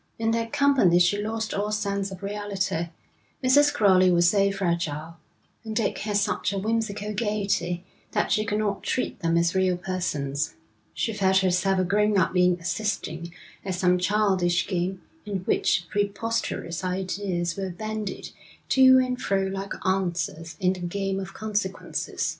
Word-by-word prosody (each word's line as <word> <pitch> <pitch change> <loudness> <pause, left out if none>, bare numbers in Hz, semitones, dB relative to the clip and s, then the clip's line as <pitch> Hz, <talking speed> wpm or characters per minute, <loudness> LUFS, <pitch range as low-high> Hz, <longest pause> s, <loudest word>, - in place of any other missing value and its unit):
In 225 0 0
their 230 0 0
company 265 -9 +4
she 180 +4 +3
lost 220 +1 -3
all 205 +1 -1
sense 200 -2 -1
of 190 0 -10
reality; 195 -4 -2 0.5
Mrs. 290 +3 +5
Crowley 190 -9 +4
was 175 -1 +4
so 200 +1 +3
fragile, 170 -4 -2 0.5
and 220 -1 -5
Dick 225 -2 0
had 210 -1 -1
such 200 -1 0
a 200 - -3
whimsical 210 0 -2
gaiety, 200 -5 -1 0.3
that - - 0
she 215 - +3
could 210 0 -1
not 205 -2 -1
treat 255 - -2
them 165 0 +1
as 170 0 +2
real 185 -1 +2
persons. 155 -6 -2 0.4
She 225 - -1
felt 190 -2 +2
herself 185 +1 +2
a 185 - +2
grown 210 +3 +2
up 185 - +2
being 180 -1 +3
assisting 170 -2 -3 0.3
at 190 -2 -2
some 180 0 +2
childish 185 -3 +2
game 185 +1 -2 0.2
in 200 -3 -3
which 180 0 +1
preposterous 205 -4 -2
ideas 185 -2 -2
were 195 -1 -3
bandied 215 +3 -5 0.4
to 260 -1 +7
and 255 -1 0
fro 195 -1 +1
like 195 +1 -3
answers 175 -4 -1
in 185 -1 +2
the 185 - -8
game 195 +2 -2
of 195 0 -7
consequences. 205 -3 -2
195 Hz, 155 wpm, -25 LUFS, 180-210 Hz, 0.5 s, to